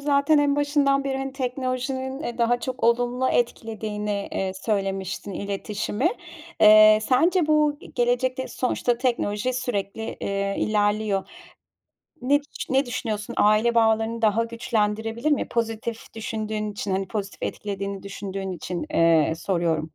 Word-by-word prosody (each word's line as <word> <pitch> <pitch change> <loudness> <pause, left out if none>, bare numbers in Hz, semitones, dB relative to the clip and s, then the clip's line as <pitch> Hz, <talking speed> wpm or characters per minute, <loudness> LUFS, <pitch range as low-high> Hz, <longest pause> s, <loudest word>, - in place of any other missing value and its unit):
zaten 285 +1 +3
en 290 0 +2
başından 285 -1 +2
beri, 270 -1 -1
hani, 270 0 -4
teknolojinin, 260 +1 -3
eee, 240 -3 -5
daha 240 +1 +2
çok 255 -1 -4
olumlu 245 +2 +2
etkilediğini, 210 -3 -2
eee, 190 -1 -1
söylemiştin 195 -1 -2
iletişimi. 205 - -2 0.5
Eee, 215 0 +8
sence 320 - +3
bu 300 -1 +3
ge - - -12
gelecekte 250 +2 0
sonuçta 245 -1 -1
teknoloji 240 -2 0
sürekli, 225 -3 -3
eee, 200 0 -1
ilerliyor. 205 -1 +1 0.9
Ne 280 +3 +3 0.3
ne 265 +1 +2
düşünüyorsun? 225 -4 -4
Aile 215 +3 +4
bağlarını 225 0 +2
daha 220 +1 +3
güçlendirebilir 225 +2 -1
mi? 290 - +1
Pozitif 225 0 -3
düşündüğün 215 -2 -3
için, 200 -1 -4
hani, 190 0 -1
pozitif 200 -1 -5
etkilediğini 200 -1 -4
düşündüğün 195 -1 -5
için, 175 0 -4
eee, 165 -2 +4
soruyorum. 165 -3 -1
225 Hz, 125 wpm, -24 LUFS, 205-255 Hz, 0.9 s, Eee